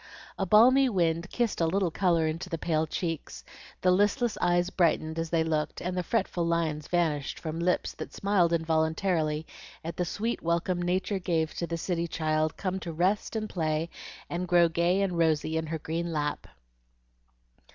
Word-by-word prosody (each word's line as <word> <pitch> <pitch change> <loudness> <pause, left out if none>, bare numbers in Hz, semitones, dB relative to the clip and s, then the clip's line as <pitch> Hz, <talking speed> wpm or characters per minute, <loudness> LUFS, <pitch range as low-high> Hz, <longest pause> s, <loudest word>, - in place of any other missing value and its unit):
A 195 - 0
balmy 255 +7 +6
wind 170 -3 0
kissed 235 -7 -1
a 165 - +3
little 185 0 +1
color 170 -3 +2
into 165 +3 -3
the 165 - -2
pale 160 -1 0
cheeks, 155 - -4 0.4
the 185 - +4
listless 205 +5 +2
eyes 175 +1 +2
brightened 165 -2 +1
as 165 0 -2
they 165 -1 +2
looked, 155 -2 -1
and 180 +1 -3
the 180 - 0
fretful 185 -2 -1
lines 165 -3 -1
vanished 160 -5 0
from 160 0 -5
lips 180 +1 0
that - - -7
smiled 195 -4 +2
involuntarily 160 -1 0 0.4
at 165 +1 -5
the 180 - +1
sweet 220 +7 -2
welcome 170 +2 0
Nature 185 +3 0
gave 165 -3 -1
the 170 -1 -3
city 170 0 -2
child 155 -1 0
come 190 -1 -2
to 170 -2 -5
rest 185 +8 0
and 215 -1 -1
play 160 -3 -1 0.4
and 180 +1 -3
grow 175 -1 +5
gay 170 +4 +1
and 180 -3 -1
rosy 160 -1 +2
in 160 0 -1
her 160 +1 -2
green 165 +2 -3
lap. 150 -2 -2
170 Hz, 170 wpm, -28 LUFS, 160-185 Hz, 0.4 s, balmy